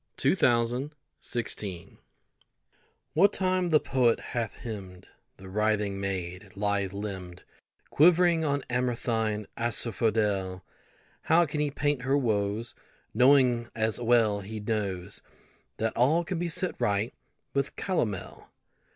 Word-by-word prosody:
POETRY 120 +4 +2 0.5
EVERYWHERE 95 -6 -6 1.2
WHAT 195 +6 +5
time 185 -1 +1
the 155 -2 +5
poet 125 -5 +2
hath 115 -3 -4
hymned 95 -6 -8 0.3
The 95 - -12
writhing 105 0 0
maid, 95 0 -4
lithe 100 -1 0
limbed, 95 -3 -6 0.5
Quivering 170 +1 +5
on 140 -2 0
amaranthine 115 -3 -1
asphodel, 105 -5 0 0.6
How 170 +2 +4
can 150 0 -4
he 150 -1 +1
paint 145 -1 -1
her 135 +3 +2
woes, 110 -2 -1 0.4
Knowing, 125 -3 +4
as 110 0 0
well 115 -3 +3
he 105 +2 -6
knows, 100 -4 -3 0.6
That 115 0 -1
all 150 +8 +3
can 175 0 -3
be 175 0 -1
set 180 +2 +1
right 100 +3 0 0.4
with 140 0 -1
calomel? 110 - -3
115 Hz, 115 wpm, -28 LUFS, 100-140 Hz, 1.2 s, WHAT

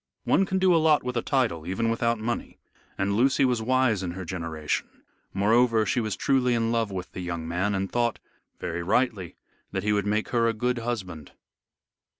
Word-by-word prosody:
One 195 - +2
can 190 - 0
do 185 -1 +4
a 165 - +4
lot 155 -1 +4
with 125 0 -4
a 120 - +1
title 115 - 0
even 115 +5 0
without 115 0 +1
money, 115 +2 -4 0.4
and 100 +1 0
Lucy 135 +4 +3
was 125 -3 +1
wise 125 -3 +2
in 90 -2 -4
her 95 0 -6
generation. 80 -4 -3 0.4
Moreover, 110 +3 +3
she 130 - 0
was 110 -3 -2
truly 125 -3 +2
in 115 0 0
love 115 -2 0
with 95 -2 -6
the - - -7
young 85 -2 -4
man, 95 +5 0
and 95 0 -2
thought, 120 -1 0 0.4
very 85 +1 -3
rightly, 95 -2 0 0.4
that 95 - -2
he 105 0 +2
would 100 -1 0
make 105 +1 0
her 115 -1 +2
a 115 - +1
good 125 +2 -1
husband. 95 -10 -5
110 Hz, 195 wpm, -26 LUFS, 95-125 Hz, 0.4 s, do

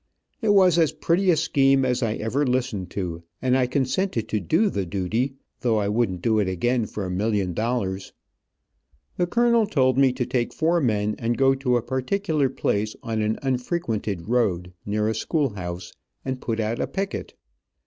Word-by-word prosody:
It 220 - +1
was 180 -3 +5
as 160 -3 +3
pretty 185 +3 +1
a 170 - +5
scheme 135 -2 +3
as 125 0 0
I 110 -2 0
ever 120 +7 -1
listened 125 - -1
to, 85 -4 -4 0.2
and 130 0 +2
I 130 -1 +2
consented 130 - -1
to 110 - 0
do 175 - +2
the 100 - -1
duty, 105 +9 -1 0.2
though 115 -4 +1
I 100 -1 0
wouldn't 105 -5 0
do 110 -2 +3
it 100 - +1
again 115 +5 0
for 105 - -5
a 90 - -4
million 100 -1 0
dollars. 100 -3 -2 1.1
The 175 - +1
colonel 235 +1 +3
told 130 - +2
me 135 -2 +5
to 125 -1 -2
take 120 -1 -1
four 170 +1 +2
men 105 -4 +1
and 115 +1 -1
go 135 0 +4
to 130 -2 +1
a 120 - -2
particular 145 +3 0
place 105 -4 -1
on 110 -1 -2
an 110 +1 0
unfrequented 125 - -2
road, 95 -7 0
near 105 +1 0
a 110 - +1
school 145 +6 0
house, 90 -2 -6 0.3
and 130 -1 -3
put 115 -1 -2
out 110 +1 -1
a - - -1
picket. 195 0 -4
120 Hz, 185 wpm, -24 LUFS, 105-135 Hz, 1.1 s, was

